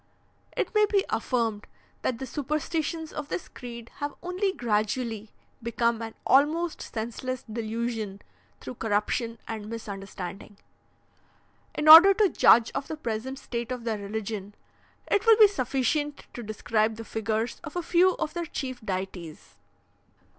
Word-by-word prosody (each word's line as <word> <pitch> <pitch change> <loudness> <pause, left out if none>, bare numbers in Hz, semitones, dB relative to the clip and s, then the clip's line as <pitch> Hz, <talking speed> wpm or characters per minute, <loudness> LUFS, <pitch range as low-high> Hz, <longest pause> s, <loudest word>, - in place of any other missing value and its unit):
"It - - -1
may 425 -1 +4
be 400 -1 +2
affirmed, 225 -5 -1 0.3
that 250 - -1
the 265 - -5
superstitions 310 +4 -3
of 295 -2 -5
this - - -4
creed 235 -2 -9
have 290 0 -4
only 365 +2 0
gradually 220 - -1 0.3
become 235 0 0
an 225 -1 -6
almost 310 +5 +3
senseless 240 +3 -4
delusion 225 -2 -4 0.4
through - - -7
corruption 225 +2 0
and 215 -2 -5
misunderstanding. 200 -2 -7 1.2
"In 300 - -1
order 345 +6 +11
to 415 -2 +4
judge 235 -7 +5
of 275 - -3
the 315 - -5
present 250 0 -4
state 235 -2 -5
of 250 -2 -4
their 225 -2 -2
religion, 205 0 -5 0.5
it 410 +3 0
will 450 -1 +8
be 430 -2 +9
sufficient 280 - -1
to 240 - -6
describe 215 0 0
the 225 +1 -8
figures 220 +1 -2
of 305 0 -8
a 350 - -1
few 360 +2 +4
of 305 - -3
their 345 0 -3
chief 260 -5 -5
deities. 185 -5 -5
235 Hz, 140 wpm, -27 LUFS, 220-300 Hz, 1.2 s, order